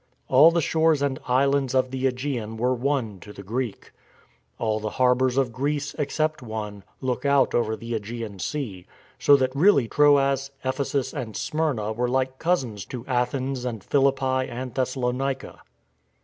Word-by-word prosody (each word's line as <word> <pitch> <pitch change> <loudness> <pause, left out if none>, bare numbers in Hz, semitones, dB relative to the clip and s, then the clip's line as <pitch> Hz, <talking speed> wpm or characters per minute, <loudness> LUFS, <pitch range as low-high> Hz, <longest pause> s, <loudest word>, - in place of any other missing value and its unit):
All 140 +5 +8
the 170 0 +1
shores 160 -2 +2
and 135 -2 -1
islands 135 +1 +2
of 130 -1 +2
the 130 0 -2
^gean 125 -4 -2
were 125 +3 +1
one 125 -6 -1
to 105 - -11
the 100 - -10
Greek. 115 +2 -4 0.7
All 110 -1 0
the 110 0 -3
harbours 125 0 +3
of 135 -3 +2
Greece, 145 +3 -2
except 155 +1 -1
one, 105 -4 -6 0.2
look 130 -2 -2
out 140 -2 +3
over 110 -2 +1
the 115 +1 -8
^gean 105 -2 -7
Sea, 105 - -4 0.3
so 145 - +6
that 130 -1 0
really 145 - +4
Troas, 140 -1 +3 0.2
Ephesus 135 0 -1
and 110 -4 -5
Smyrna 140 -9 -1
were 120 +2 -1
like 130 0 -1
cousins 130 - 0
to 125 -3 -7
Athens 130 +1 -1
and 120 -4 -4
Philippi 135 -2 +1
and 125 0 -6
Thessalonica. 130 +1 -2
130 Hz, 155 wpm, -25 LUFS, 120-140 Hz, 0.7 s, All